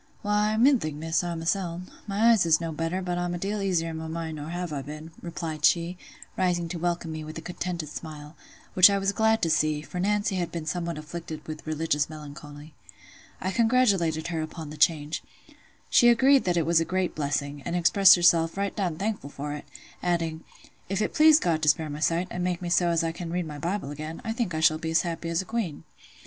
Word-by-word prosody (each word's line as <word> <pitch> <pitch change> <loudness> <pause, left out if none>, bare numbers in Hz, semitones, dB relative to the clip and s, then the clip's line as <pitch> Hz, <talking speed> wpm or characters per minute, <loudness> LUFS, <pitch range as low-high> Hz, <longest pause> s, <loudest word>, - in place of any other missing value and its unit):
"Why, 210 +1 +1
middling, 230 - +3
Miss, 165 +3 0
i' 175 -1 -3
myseln—my 185 +5 0
eyes 220 -5 +4
is 160 -1 +4
no 165 -1 -3
better, 165 +4 -2
but 175 -1 -2
I'm 175 0 -2
a - - -3
deal 200 +3 -3
easier 175 -4 0
i' - - -5
my 160 0 -5
mind 160 -1 -4
nor 150 0 -6
I - - -6
have 175 -1 -4 0.2
been," 155 +2 -8
replied 165 -3 -5
she, 170 +2 +3 0.4
rising 175 -2 0
to 170 - -4
welcome 170 -1 -2
me 155 0 -5
with 155 +1 -8
a - - -6
contented 175 -1 -4
smile; 150 0 -9 0.4
which 185 +2 +8
I 200 - +1
was 195 0 +1
glad 220 +1 +2
to 165 - +2
see, 155 -1 +1
for 180 - -6
Nancy 205 +1 0
had 175 -2 -2
been 170 -2 -5
somewhat 170 0 -3
afflicted 155 +1 -7
with 155 0 -7
religious 155 -2 0
melancholy. 150 0 -10 0.7
I 185 - -2
congratulated 195 -9 +2
her 165 -2 -2
upon 155 -1 -7
the - - -7
change. 150 0 +1 0.7
She 240 - +6
agreed 265 +3 +5
that 175 -1 +1
it 165 - +1
was 165 0 +4
a - - +2
great 185 +1 -1
blessing, 140 -1 -2
and 170 - -3
expressed 185 +2 +6
herself 170 -1 +3
"right 200 0 -2
down 180 -6 -2
thankful 200 -7 -3
for 145 +1 -5
it"; 150 - -7 0.4
adding, 165 -2 -1 0.5
"If 195 0 -1
it - - -2
please 310 0 +7
God 165 -3 0
to 150 - +3
spare 155 0 +1
my 145 - -6
sight, 170 +3 +1
and 180 - -3
make 180 -1 -1
me 175 - -4
so 175 0 +3
as 170 -1 +2
I 165 - 0
can 170 0 -7
read 175 +1 -2
my 150 -2 -7
Bible 170 -2 -3
again, 155 +2 -6
I 225 - -2
think 225 -8 -2
I 155 - -1
shall 155 -1 +4
be 160 -1 -4
as 165 +1 +2
happy 170 -1 -4
as 170 +2 0
a - - -17
queen." 215 -9 -3
170 Hz, 225 wpm, -26 LUFS, 155-185 Hz, 0.7 s, which